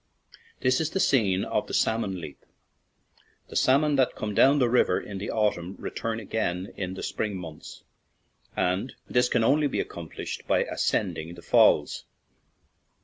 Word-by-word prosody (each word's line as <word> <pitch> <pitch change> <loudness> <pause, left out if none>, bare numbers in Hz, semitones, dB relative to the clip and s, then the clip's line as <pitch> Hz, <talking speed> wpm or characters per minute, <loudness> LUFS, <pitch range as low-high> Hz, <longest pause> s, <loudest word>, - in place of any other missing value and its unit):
This 130 +3 +2
is 160 - 0
the 190 - -2
scene 100 - +2
of - - -1
the - - -3
"salmon 105 -5 0
leap." 75 -4 -10 1.1
The - - -10
salmon 145 +2 +3
that 130 -2 +2
come 105 -1 -4
down 135 +8 +5
the 125 -4 +3
river 120 -6 +3
in 100 -2 -7
the 100 - -5
autumn 100 -4 -1
return 115 -1 -4
again 95 -4 -3
in 95 -1 -4
the - - -7
spring 105 -3 -2
months, 80 -4 -10 0.7
and 95 +8 0
this 125 0 +2
can 115 - +2
only 145 +5 +3
be - - -2
accomplished - - -6
by - - +3
ascending 85 +2 -2
the 85 - -13
falls. - - +3
110 Hz, 155 wpm, -26 LUFS, 95-130 Hz, 1.1 s, down